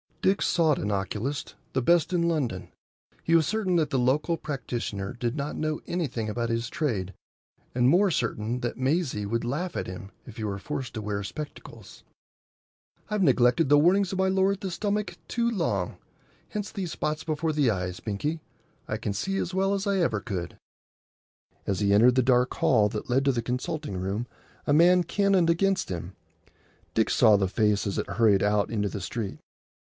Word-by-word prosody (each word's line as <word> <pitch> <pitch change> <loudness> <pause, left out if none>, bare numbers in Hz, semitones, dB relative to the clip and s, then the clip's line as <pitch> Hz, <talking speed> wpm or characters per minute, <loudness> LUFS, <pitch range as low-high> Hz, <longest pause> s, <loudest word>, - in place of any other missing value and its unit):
Dick 195 +2 +3
sought 160 -5 +3
an 105 - -2
oculist,—the 120 - -3
best 170 +6 +3
in 175 -1 +2
London. 130 - -2 0.5
He 165 - +1
was 160 -3 +4
certain 205 -4 0
that 155 -2 +1
the 135 - +1
local 145 +7 +2
practitioner 120 -8 -4
did 120 0 -2
not 145 0 -3
know 155 0 -2
anything 130 -11 -2
about 115 +2 -2
his 115 +1 -1
trade, 105 - -2 0.6
and 125 0 +3
more 185 +5 +4
certain 120 -3 -1
that 120 -1 -3
Maisie 130 - 0
would 115 +3 -1
laugh 150 +9 -3
at - - -3
him 95 +2 -8 0.2
if 120 - -11
he 110 - -4
were 100 -2 -3
forced 135 +3 -5
to 110 - -3
wear 105 -1 -3
spectacles. 150 +9 -9 1.1
"I've 210 -2 +1
neglected 130 +1 +4
the 145 0 +7
warnings 185 +4 +3
of 190 - -3
my 190 - +3
lord 190 +1 +2
the 195 - -3
stomach 200 -1 -2
too 235 -1 0
long. 105 - -1 0.5
Hence 210 -1 -4
these 185 -6 -4
spots 150 +1 -2
before 155 0 -1
the 145 -4 +3
eyes, 90 -2 -3
Binkie. 150 +10 -3 0.5
I - - -2
can 100 - -3
see 195 - -2
as 185 -1 -2
well 195 +1 +2
as 200 0 -1
I 200 -1 +2
ever 135 - +1
could." 95 -5 -5 1.1
As 100 - -1
he 100 -1 +2
entered 120 +5 +6
the 130 - +4
dark 125 0 +3
hall 105 -5 +3
that 105 +3 -5
led 135 +3 +2
to 140 - +4
the 120 -2 -1
consulting 125 - -3
room 100 +6 -2 0.4
a 145 - +3
man 175 +3 +6
cannoned 195 -3 +2
against 190 +3 +1
him. 90 +1 -5 0.8
Dick 110 - +2
saw 110 -4 +5
the 95 -1 +1
face 105 +1 +1
as 100 - -2
it - - -3
hurried 100 -1 +3
out 105 0 +2
into 105 -3 0
the 100 - -5
street. 105 +1 -4
130 Hz, 185 wpm, -27 LUFS, 105-170 Hz, 1.1 s, the